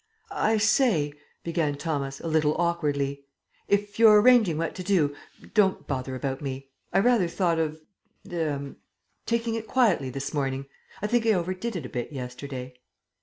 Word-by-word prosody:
"I 220 - +2
say," 210 - +2 0.3
began 160 -4 -1
Thomas, 140 -3 -3
a - - -6
little 155 -1 +2
awkwardly, 145 -5 0 0.4
"if 205 +1 0
you're 215 -2 +8
arranging 220 -8 +5
what 165 +1 -2
to 185 - -6
do, 165 -7 +2 0.4
don't 200 -4 +2
bother 130 -1 -3
about 135 0 -3
me. 135 -1 -5 0.2
I 180 - +1
rather 220 -3 +4
thought 170 -1 0
of 155 -1 -1 0.5
er 145 -5 -2 0.5
taking 230 0 0
it 225 -1 -4
quietly 215 - +2
this 135 +4 -5
morning. 135 -2 -1 0.4
I - - +1
think 235 +2 +2
I 220 - +5
overdid 185 +5 -2
it 165 -7 -4
a - - -7
bit 120 +4 -4
yesterday." 125 -1 -7
165 Hz, 160 wpm, -26 LUFS, 140-205 Hz, 0.5 s, you're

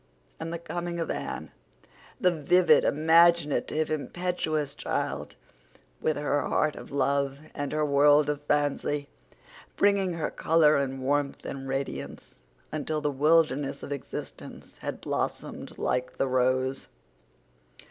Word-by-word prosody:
And 165 +1 -5
the 170 - -3
coming 170 0 -4
of 165 - -2
Anne—the 180 - -5
vivid, 175 +3 +4
imaginative, 155 -1 +3
impetuous 155 -2 -2
child - - -3 0.7
with 155 - +1
her 145 0 0
heart 155 +1 0
of - - -10
love, 140 0 +1 0.2
and 145 -2 -4
her 155 0 +1
world 145 +1 +5
of 145 -1 -2
fancy, 145 0 0 0.7
bringing 200 -2 +3
with 165 - -6
her 155 - -1
color 155 -2 +4
and 135 -1 -1
warmth 145 +1 -1
and 135 -1 -6
radiance, 135 +1 -5 0.3
until 155 0 -2
the 150 -1 -1
wilderness 145 -1 +2
of - - -7
existence 140 -2 -7
had - - -5
blossomed - - -4
like 125 0 -1
the 135 - +1
rose. 130 +1 +1
150 Hz, 125 wpm, -27 LUFS, 140-160 Hz, 0.7 s, world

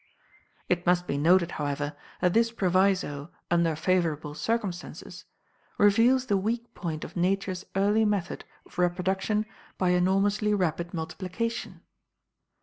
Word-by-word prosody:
It 175 0 +1
must 175 0 +3
be 140 - -2
noted, 170 +4 +4
however, 145 0 -2 0.3
that 180 -1 +3
this 230 0 +3
proviso 185 -7 +1 0.2
"under 170 -2 +3
favorable 155 -3 0
circumstances" 180 +2 -4 0.5
reveals 230 +6 +4
the 205 -6 +2
weak 230 +4 -2
point 160 -3 -4
of - - -9
Nature's 190 +1 -1
early 205 +3 +3
method 205 -4 -1 0.2
of - - -11
reproduction 190 +4 0 0.3
by 185 - +1
enormously 195 +4 +2
rapid 170 -2 -1
multiplication. 185 +7 -4
185 Hz, 120 wpm, -27 LUFS, 170-205 Hz, 0.5 s, noted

